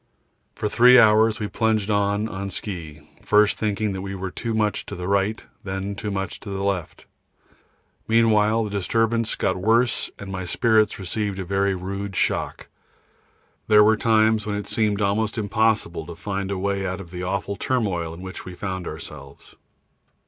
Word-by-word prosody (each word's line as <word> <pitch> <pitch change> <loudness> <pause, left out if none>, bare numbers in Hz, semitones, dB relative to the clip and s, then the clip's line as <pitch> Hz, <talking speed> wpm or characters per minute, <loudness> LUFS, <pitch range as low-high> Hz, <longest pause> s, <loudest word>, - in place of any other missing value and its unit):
For 105 - -2
three 125 +4 +6
hours 110 -1 +5
we 105 - -2
plunged 110 -1 0
on 100 +1 +1
on 100 -2 -5
ski, 80 -7 -6 0.2
first 105 0 +3
thinking 105 -2 -1
we 100 0 -5
were 95 -1 -5
too 115 +3 -3
much 105 -1 0
to - - -6
the 90 0 -5
right, 100 +2 0 0.2
then 95 +1 -4
too 105 +1 -5
much 95 -1 -4
to 105 - -9
the 95 0 -3
left; 95 -5 -3 1.0
meanwhile 110 -1 +3
the 105 - -5
disturbance 115 +3 0
got 95 - 0
worse 115 +5 +2
and 100 -1 -8
my 95 -1 -4
spirits 110 +3 +2
received 100 +1 -3
a 95 - -4
very 100 +1 +1
rude 100 +1 -5
shock. - - -1 1.0
There 105 -1 +7
were 110 +1 +5
times 110 -1 +2
when 105 - -1
it 105 - -4
seemed 105 -2 0
almost 105 +2 0
impossible 110 -5 0
to 85 - -8
find 95 +2 -4
a 100 - -2
way 100 +1 -1
out 95 0 -3
of 90 -3 -10
the 90 -1 -6
awful 100 +2 -2
turmoil 100 -9 -1
in 85 +2 -10
which 95 0 -7
we 90 - -9
found 95 -2 -4
ourselves. 75 -3 -10
100 Hz, 170 wpm, -23 LUFS, 95-110 Hz, 1.0 s, There